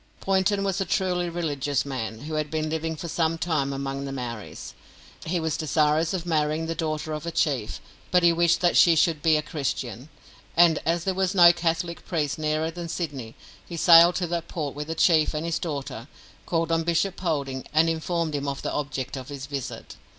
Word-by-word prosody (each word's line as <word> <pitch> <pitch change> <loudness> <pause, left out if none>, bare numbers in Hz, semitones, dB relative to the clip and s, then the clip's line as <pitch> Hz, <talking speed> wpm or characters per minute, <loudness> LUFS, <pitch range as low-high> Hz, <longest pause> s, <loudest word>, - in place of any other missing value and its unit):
Poynton 195 +1 +1
was 195 0 -1
a - - 0
truly 180 -1 0
religious 145 -5 -1
man, 115 -5 -5
who 155 +2 -6
had 155 -1 -1
been 155 0 -2
living 160 0 -2
for 170 - -6
some 165 0 0
time 155 -5 -1
among 135 0 -4
the 135 - -5
Maoris. 120 -5 -6 0.5
He 175 +2 0
was 160 -2 -1
desirous 155 +1 +1
of 180 -3 -3
marrying 155 -1 0
the 165 - -2
daughter 155 -1 -3
of 155 +2 -5
a - - -2
chief, 135 -10 -1 0.3
but 180 -1 +3
he 170 -1 +6
wished 170 0 +2
that 175 -1 +3
she 170 -2 +6
should 160 -1 +2
be 160 0 +4
a 150 - -2
Christian, 135 - -4 0.5
and, 170 -2 +6
as 170 0 +1
there 190 - 0
was 190 +1 0
no 175 -2 +8
Catholic 170 0 -2
priest 150 -4 -2
nearer 155 +1 0
than 170 0 -7
Sydney, 140 -10 -5 0.3
he 170 - -8
sailed 170 +1 +7
to 180 - 0
that 170 -1 -3
port 150 -5 -4
with 150 +1 -6
the 160 - -3
chief 160 -2 +3
and 155 +2 -2
his 170 -1 -1
daughter, 140 -7 -5 0.4
called 165 -1 0
on 165 0 +2
Bishop 170 +3 0
Polding, 140 -7 -3
and 155 +2 +4
informed 165 0 -1
him 145 -1 -2
of 140 -1 -4
the - - -2
object 140 -3 -3
of 130 0 -7
his 140 -2 -6
visit. 140 -3 -6
160 Hz, 205 wpm, -25 LUFS, 145-170 Hz, 0.5 s, no